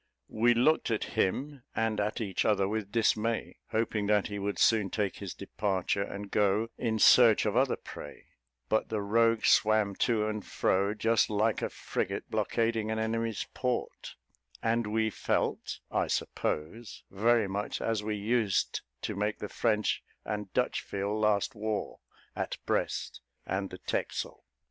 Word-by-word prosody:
We 120 +2 +3
looked 140 +6 +3
at 110 -2 0
him 135 +8 -1
and 115 -2 0
at 105 +3 -1
each 100 -4 -1
other 100 -3 +2
with 105 -1 -3
dismay, 115 0 0
hoping 110 -2 0
that 105 0 +2
he 100 0 -4
would 100 -2 -2
soon 105 -1 +4
take 100 -2 -1
his - - -6
departure, 100 -1 -1
and 100 0 -5
go 105 +2 +2
in 115 -2 -1
search 115 0 +7
of 105 0 0
other 130 +1 +3
prey; - - -10 0.4
but 110 - +1
the 110 - -1
rogue 115 +2 +3
swam 110 -2 +4
to 110 -3 +2
and 110 -1 -3
fro, 100 +2 +1
just 115 +1 +2
like 110 +1 +1
a - - -1
frigate - - -4
blockading 115 -2 0
an 110 - -1
enemy's 110 0 -1
port, 125 -1 -3 0.5
and 115 0 +1
we 110 +1 +1
felt, - - -1
I - - +1
suppose, 100 +9 -3
very 110 +2 +3
much 100 +2 -3
as 115 -2 0
we 105 0 -2
used 105 -1 0 0.2
to - - -2
make 105 +1 -1
the 105 - -6
French 105 -3 +1 0.2
and 105 -2 -4
Dutch - - +1
feel 100 +1 -3
last 105 +3 +1
war, 110 -1 -3 0.4
at - - -3
Brest - - -1 0.2
and 95 0 -2
the 90 - -8
Texel. - - -3
110 Hz, 155 wpm, -30 LUFS, 100-115 Hz, 0.5 s, search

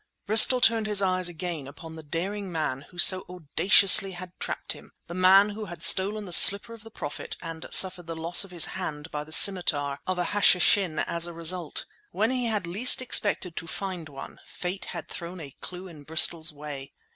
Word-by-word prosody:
Bristol 225 +4 +4
turned 225 -2 +3
his 205 -2 0
eyes 185 -1 -1
again 170 -4 -7
upon 160 +3 -12
the 160 - -10
daring 185 +6 -6
man 150 -5 -5
who 180 - -19
so 185 +1 +5
audaciously 190 +3 +2
had 180 0 -11
trapped - - -6
him—the 170 - -15
man 190 +3 +4
who 210 +1 -8
had 175 -3 -10
stolen 205 +2 +2
the 180 - -5
slipper 200 +6 +6
of 225 -2 -14
the 225 - -13
Prophet 145 -9 -8
and 165 -1 -9
suffered 180 -2 +5
the 165 - -7
loss 165 +4 +3
of 195 - -12
his 175 -3 0
hand 160 -4 -8
by 150 0 -6
the 155 - -17
scimitar 150 -7 +4
of 185 -1 -3
an 180 - -2
Hashishin 190 -3 +2
as 170 0 -2
a 175 - -9
result. 170 0 -2 0.2
When 220 - -2
he 250 -2 -2
had 210 -5 -3
least 205 +9 +2
expected 205 -8 -2
to 165 - -7
find 180 -2 -7
one, 135 -1 -12
Fate 180 +2 -7
had - - -9
thrown 175 +1 -9
a 145 -4 -10
clue 180 +1 -10
in 160 -5 -14
Bristol's 160 +2 0
way. 145 -2 -10
180 Hz, 195 wpm, -25 LUFS, 160-200 Hz, 0.2 s, slipper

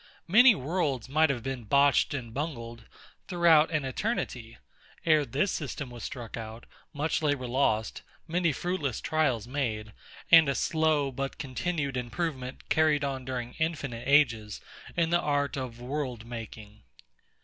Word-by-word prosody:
Many 225 +6 +7
worlds 145 -5 -1
might 155 +3 +3
have 125 -4 -2
been 135 -2 -4
botched 140 +4 +3
and 120 -4 -6
bungled, 120 -6 -5 0.4
throughout 170 -4 +5
an 155 -4 -1
eternity, 130 - -3 0.5
ere 155 -3 +4
this 150 +9 0
system 140 -3 -4
was 120 -2 -9
struck 120 -4 -6
out; 115 0 -8 0.3
much 155 +2 -1
labour 145 -4 0
lost, 120 -3 0 0.3
many 170 0 +1
fruitless 150 - -2
trials 155 -9 0
made; 110 -6 -3 0.4
and 165 -4 +8
a 140 - 0
slow, 155 -3 +1
but 135 +1 -4
continued 140 0 -3
improvement 130 0 -4
carried 155 -2 +3
on 135 -2 -3
during 125 -2 -4
infinite 145 -8 -2
ages 120 -8 +3 0.4
in 165 -1 +2
the 175 - +4
art 145 -1 0
of 125 -3 -5
world 125 -3 -4
making. 110 -2 -9
140 Hz, 140 wpm, -28 LUFS, 120-155 Hz, 0.5 s, and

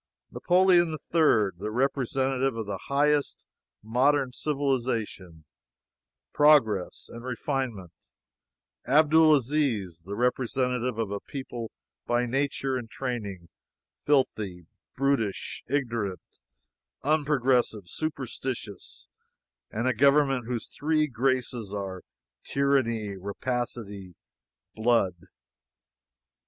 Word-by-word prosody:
Napoleon 180 -1 +4 0.2
III, 115 - +4
the 105 +2 -3
representative 135 +1 0
of 110 - -3
the 100 -2 -4
highest 145 +1 +1 0.4
modern 130 +4 +2
civilization, 120 - -2 0.9
progress, 125 -11 +3
and 120 0 -10
refinement; 125 - -3 1.0
Abdul 155 +3 +6
Aziz, 120 - 0
the 100 +4 -6
representative 125 0 0
of 110 -3 -2
a 100 - -2
people 120 -4 -6 0.4
by 120 +1 +2
nature 135 +1 -1
and 120 -3 -7
training 105 -10 -5 0.5
filthy, 105 - 0 0.3
brutish, 135 -7 -1
ignorant, 115 -9 -3 0.6
unprogressive, 135 - +1
superstitious 130 - -5 0.6
and 115 +4 -2
a 130 - +3
government 135 0 +3
whose 120 -2 -3
Three 155 +1 +1
Graces 125 -5 -1
are 95 -2 -5 0.4
Tyranny, 115 -7 0
Rapacity, 100 -2 -4 0.6
Blood. 110 -5 +2
125 Hz, 85 wpm, -27 LUFS, 105-140 Hz, 1.0 s, Abdul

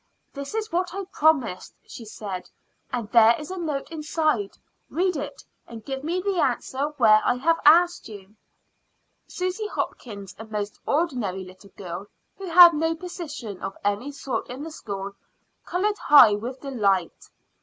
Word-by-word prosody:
"This 280 +7 -6
is 440 -2 -3
what 360 +1 -1
I 395 -1 -4
promised," 290 - +1
she 230 - -10
said; 200 -4 -7 0.4
"and 240 -4 -3
there 230 0 +7
is 300 +3 -8
a 375 - -5
note 305 -3 -3
inside. 305 -9 -1 0.3
Read 360 +4 0
it, 285 0 -6 0.2
and 225 -2 -10
give 270 0 -5
me 340 +4 -1
the 385 -1 -1
answer 260 0 0
where 215 -4 +6
I - - +2
have 330 +6 +1
asked 345 -1 +5
you." 205 -1 -12 0.9
Susy 370 +4 -3
Hopkins, 200 - -5
a 220 - -7
most 210 -1 -5
ordinary 250 - -1
little 185 +2 -14
girl, 180 +1 -7 0.3
who 390 - -8
had 345 0 +9
no 325 +2 0
position 305 - -7
of 195 - -5
any 205 +7 -1
sort 275 -2 -4
in 255 +4 -6
the 320 - -7
school, 200 -8 -6 0.6
colored 410 +3 0
high 255 -7 +7
with 240 +6 -5
delight. 200 - -1
275 Hz, 155 wpm, -24 LUFS, 210-330 Hz, 0.9 s, had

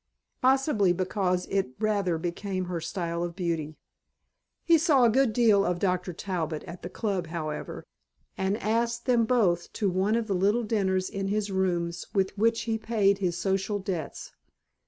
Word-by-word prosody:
Possibly 260 - +3
because 185 0 0
it 190 -10 -1
rather 200 -6 +1
became 185 +3 -3
her 175 -2 -4
style 170 -1 -3
of 175 -1 -3
beauty. 165 -4 -3 0.9
He 335 -2 +5
saw 300 -6 +4
a 235 - +5
good 265 0 +3
deal 215 -3 +4
of 180 -2 0
Dr. 180 0 0
Talbot 165 -4 -3
at 170 - -9
the 175 - -6
Club 190 -3 -2
however 155 -2 -5 0.5
and 190 +2 0
asked 235 +2 -1
them 240 -3 +3
both 195 -8 +1
to 200 -3 0
one 190 +4 +1
of 230 -1 0
the 205 - -1
little 205 +6 +2
dinners 190 -4 0
in 195 0 -3
his 205 0 -1
rooms 175 -2 -1
with 190 -1 +1
which 225 +2 +2
he 225 -1 -2
paid 205 -3 +2
his 175 -3 -1
social 195 +3 0
debts. 190 -6 -5
195 Hz, 165 wpm, -27 LUFS, 175-220 Hz, 0.9 s, He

